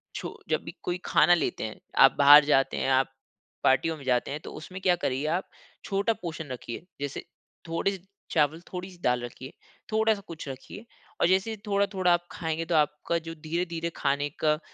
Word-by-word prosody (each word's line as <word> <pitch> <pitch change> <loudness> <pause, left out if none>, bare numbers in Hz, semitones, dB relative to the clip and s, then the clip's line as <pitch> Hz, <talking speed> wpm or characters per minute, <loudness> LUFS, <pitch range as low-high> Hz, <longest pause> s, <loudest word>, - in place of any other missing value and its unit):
छो - - -6
जब - - +1
भी - - -8
कोई 180 0 -2
खाना 175 - +5
लेते - - -2
हैं, 110 -1 -6 0.2
आप 135 - +8
बाहर 145 +1 +9
जाते 135 -2 +2
हैं, - - 0
आप 135 0 +2 0.5
पार्टियों 160 +5 +3
में 140 - -12
जाते 125 +1 +1
हैं, 150 - -3
तो - - -9
उसमें 185 +4 -8
क्या 180 -2 +4
करिए 135 -4 -2
आप 190 - -7 0.4
छोटा 200 +3 +1
पोर्शन 160 -6 -6
रखिए, 125 +5 -6 0.2
जैसे 145 -1 -4 0.4
थोड़े 170 +4 +1
से - - -22 0.3
चावल, 155 +1 +2
थोड़ी-सी 180 0 -6
दाल 125 -1 +2
रखिए, 130 +3 -8 0.4
थोड़ा-सा 220 -1 +2
कुछ 165 -3 -8
रखिए 135 - -8 0.4
और - - +5
जैसे 190 +5 +2
थोड़ा-थोड़ा 200 -3 +2
आप 175 0 -1
खाएँगे, 160 -1 -3
तो 170 - 0
आपका 150 +2 +1
जो 165 - -5
धीरे-धीरे 165 +1 -3
खाने 140 +1 0
का 155 0 +2
160 Hz, 185 wpm, -27 LUFS, 140-180 Hz, 0.5 s, बाहर